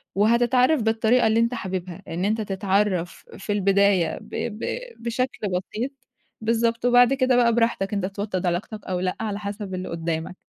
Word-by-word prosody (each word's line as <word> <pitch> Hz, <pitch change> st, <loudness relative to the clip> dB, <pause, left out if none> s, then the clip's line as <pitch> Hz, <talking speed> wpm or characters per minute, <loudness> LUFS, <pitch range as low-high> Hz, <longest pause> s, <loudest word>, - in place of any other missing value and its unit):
وهتتعرّف 240 Hz, +6 st, +3 dB
بالطريقة 225 Hz, +2 st, +3 dB
اللي 220 Hz, +1 st, +3 dB
أنت 230 Hz, +1 st, +2 dB
حاببها 185 Hz, -6 st, -5 dB
إن 175 Hz, +3 st, -2 dB
أنت 215 Hz, +2 st, 0 dB
تتعرّف 195 Hz, -2 st, -1 dB
في 205 Hz, -, -5 dB
البداية 200 Hz, -4 st, +2 dB
ب -, -, -15 dB, 0.3 s
ب -, -, -3 dB, 0.4 s
بشكل 235 Hz, -1 st, -2 dB
بسيط، 200 Hz, +8 st, -3 dB, 0.5 s
بالضبط 230 Hz, +1 st, 0 dB
وبعد 245 Hz, +1 st, +6 dB
كده 260 Hz, -1 st, +2 dB
بقى 240 Hz, -1 st, +4 dB
براحتك 230 Hz, -4 st, +1 dB
أنت 200 Hz, -2 st, 0 dB
توطّد 195 Hz, -1 st, -3 dB
علاقتك 185 Hz, +4 st, -3 dB
أو 185 Hz, -1 st, -2 dB
لأ 185 Hz, 0 st, -1 dB
على 210 Hz, -2 st, -3 dB
حسب 205 Hz, -1 st, -5 dB
اللي 185 Hz, 0 st, -5 dB
قُدّامك. 165 Hz, +1 st, -3 dB
210 Hz, 160 wpm, -24 LUFS, 185-235 Hz, 0.5 s, وبعد